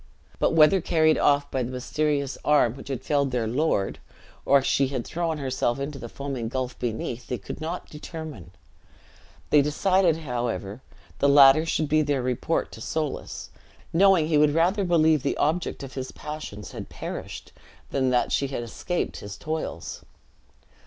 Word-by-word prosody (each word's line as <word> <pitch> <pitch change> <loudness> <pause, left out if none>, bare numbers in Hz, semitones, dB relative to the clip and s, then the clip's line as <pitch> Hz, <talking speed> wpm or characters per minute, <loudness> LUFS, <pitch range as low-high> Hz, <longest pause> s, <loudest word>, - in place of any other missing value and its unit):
But - - +2
whether 165 +4 +6
carried 155 -1 +3
off 145 0 +2
by 130 - -1
the 120 - -2
mysterious 140 +2 -1
arm 145 -6 +4
which 135 - -11
had 130 -2 -4
felled 140 -1 +1
their 125 -3 -1
lord, 120 -4 0 0.5
or 140 -1 +5
she 135 0 +2
had 130 -3 -4
thrown 165 -1 -2
herself 130 -2 -1
into 140 0 -4
the 120 -1 -7
foaming 135 -4 -4
gulf 130 0 -4
beneath, 120 +1 -4
they 125 - -2
could 100 - -8
not 165 +3 -4
determine. 150 - -8 1.0
They 150 - +7
decided, 170 +3 +2
however, 120 -6 -3 0.4
the 140 - +4
latter 140 +3 +7
should 155 -1 0
be 155 +1 +3
their 145 -3 0
report 125 +6 -1
to - - -10
Soulis; 155 -2 -4 0.4
knowing 185 -2 +5
that - - -5
he 150 -2 +4
would 150 0 +4
rather 185 +5 +2
believe 160 -4 +3
the 140 - -1
object 160 0 -1
of 135 -1 -8
his 130 -1 -5
passions 150 -9 -7
had - - -8
perished, - - -7 0.4
than 130 -2 +1
that 125 -1 +1
she 140 - +1
had 130 -3 -4
escaped 175 +9 -3
his 100 -1 -8
toils. 160 +1 -5
140 Hz, 165 wpm, -25 LUFS, 130-155 Hz, 1.0 s, They